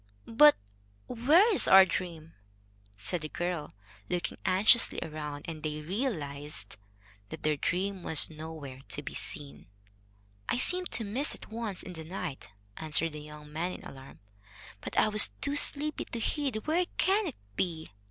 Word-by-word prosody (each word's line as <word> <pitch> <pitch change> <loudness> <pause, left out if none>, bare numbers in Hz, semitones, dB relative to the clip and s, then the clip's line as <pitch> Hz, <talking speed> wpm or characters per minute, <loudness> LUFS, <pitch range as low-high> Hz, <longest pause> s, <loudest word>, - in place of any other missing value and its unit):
"But 295 +6 +6 0.5
where 310 - +4
is - - +4
our 190 0 +9
dream?" 170 -3 -5 0.6
said 130 - -2
the 155 - -6
girl, 175 -6 -4 0.3
looking 175 -1 -3
anxiously 215 +6 +5
around. 150 -2 -6
And 160 -2 -6
they 150 0 -4
realized 150 - -4 0.5
that 160 - -8
their 155 0 +2
dream 190 +6 -2
was 160 -2 +5
nowhere 155 -4 -9
to 145 - -2
be - - -7
seen. 145 -2 -5 0.8
"I - - +1
seemed 360 +7 +2
to 230 - 0
miss 240 +8 -1
it - - -14
once 220 -4 -4
in 185 - -8
the 160 -2 -7
night," 160 - -6 0.3
answered 160 +1 0
the 150 - -8
young 150 0 -12
man 175 +4 -2
in - - -10
alarm, 135 0 -12 0.6
"but - - -7
I - - +5
was 215 0 +6
too 285 0 -2
sleepy 295 +1 +2
to 235 - -6
heed. 265 -2 -2
Where 340 +4 +1
can 390 +3 +2
it 290 - -5 0.2
be?" 160 - -3
175 Hz, 160 wpm, -30 LUFS, 150-235 Hz, 0.8 s, our